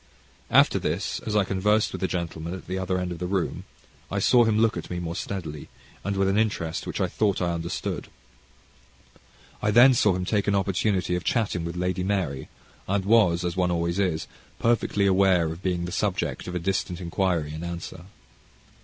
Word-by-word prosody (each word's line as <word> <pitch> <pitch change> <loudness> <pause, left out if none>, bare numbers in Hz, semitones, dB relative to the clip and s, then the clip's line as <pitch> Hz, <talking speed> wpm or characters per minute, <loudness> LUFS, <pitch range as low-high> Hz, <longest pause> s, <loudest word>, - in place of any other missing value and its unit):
After - - +5
this, - - -2
as 105 - -1
I 105 - +4
conversed 105 +3 +1
with - - -5
a 95 - +1
gentleman 85 -1 -4
at 95 - -10
the 95 +1 -3
other 95 0 -1
end 90 -1 -2
of 85 - -6
the 90 - -3
room, 95 -2 -2 0.4
I 100 - -3
saw 120 +4 +5
him 110 -1 +2
look 115 0 +3
at - - -6
me 90 - -3
more 85 -1 -4
steadily, 85 -6 -5 0.3
and 100 0 -2
with 95 0 +2
an 100 +2 +2
interest 95 -7 -1
which - - -4
I - - +2
thought 105 -3 0
I 90 -1 0
understood. 85 0 -4 1.5
I 105 - +1
then 120 +5 +7
saw 105 -5 +3
him 90 0 -2
take 100 +1 0
an 100 - +3
opportunity 95 -1 0
of 90 - -3
chatting 105 -8 0
with 85 0 -4
Lady 90 +1 -1
Mary, 90 -9 -2 0.4
and 95 0 0
was, 95 -6 +4
as 85 - -2
one 90 -1 +1
always 85 +1 -1
is, 90 -5 0 0.3
perfectly 115 -3 +1
aware 95 -3 +4
of 85 +2 -8
being 90 -2 -1
the 90 - -5
subject 95 0 -2
of 90 - -5
a - - 0
distant 90 -1 -2
inquiry 85 -3 -1
and 80 +2 -6
answer. 85 0 -6
95 Hz, 200 wpm, -25 LUFS, 85-100 Hz, 1.5 s, then